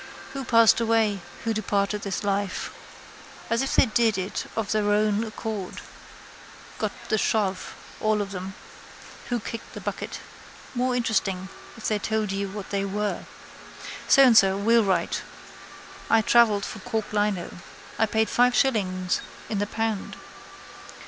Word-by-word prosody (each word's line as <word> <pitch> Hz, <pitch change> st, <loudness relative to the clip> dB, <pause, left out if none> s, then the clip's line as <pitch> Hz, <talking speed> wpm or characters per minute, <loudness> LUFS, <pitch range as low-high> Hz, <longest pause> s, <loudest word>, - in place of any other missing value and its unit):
Who 275 Hz, 0 st, -4 dB
passed 230 Hz, -1 st, +6 dB
away. 220 Hz, -3 st, +2 dB, 0.2 s
Who 225 Hz, -, 0 dB
departed 205 Hz, -1 st, 0 dB
this 200 Hz, -1 st, -3 dB
life. 200 Hz, -1 st, -1 dB, 0.8 s
As 230 Hz, -, +2 dB
if 270 Hz, -, -1 dB
they -, -, +6 dB
did 225 Hz, -2 st, +2 dB
it 190 Hz, +1 st, -3 dB
of 220 Hz, -3 st, -2 dB
their 210 Hz, -1 st, +1 dB
own 210 Hz, +1 st, +2 dB
accord. 215 Hz, -3 st, -5 dB, 1.0 s
Got -, -, 0 dB, 0.2 s
the 215 Hz, -, +2 dB
shove, 195 Hz, -4 st, 0 dB, 0.2 s
all 215 Hz, 0 st, +2 dB
of 200 Hz, -1 st, -3 dB
them. 190 Hz, 0 st, -6 dB, 0.7 s
Who 240 Hz, -1 st, 0 dB
kicked 230 Hz, +1 st, -7 dB
the -, -, -5 dB
bucket. -, -, -5 dB, 0.5 s
More 250 Hz, 0 st, 0 dB
interesting 195 Hz, -5 st, 0 dB, 0.3 s
if 220 Hz, -, -4 dB
they 215 Hz, -1 st, +1 dB
told 215 Hz, 0 st, -1 dB
you 195 Hz, 0 st, -2 dB
what 200 Hz, 0 st, -7 dB
they 200 Hz, -1 st, 0 dB
were. 205 Hz, +1 st, -2 dB, 0.8 s
So 275 Hz, -, +7 dB
and 250 Hz, -3 st, +6 dB
So, 195 Hz, -2 st, +6 dB
wheelwright. 200 Hz, -5 st, +2 dB, 0.9 s
I 225 Hz, -, +5 dB
travelled 220 Hz, -3 st, +4 dB
for -, -, -7 dB
cork 225 Hz, -3 st, -3 dB
lino. 205 Hz, -4 st, -1 dB, 0.4 s
I 220 Hz, -, +4 dB
paid 220 Hz, +1 st, +1 dB
five 245 Hz, 0 st, +3 dB
shillings 185 Hz, -8 st, +1 dB, 0.3 s
in 210 Hz, -, -1 dB
the 205 Hz, -, 0 dB
pound. 225 Hz, -2 st, -3 dB
210 Hz, 145 wpm, -25 LUFS, 200-225 Hz, 1.0 s, So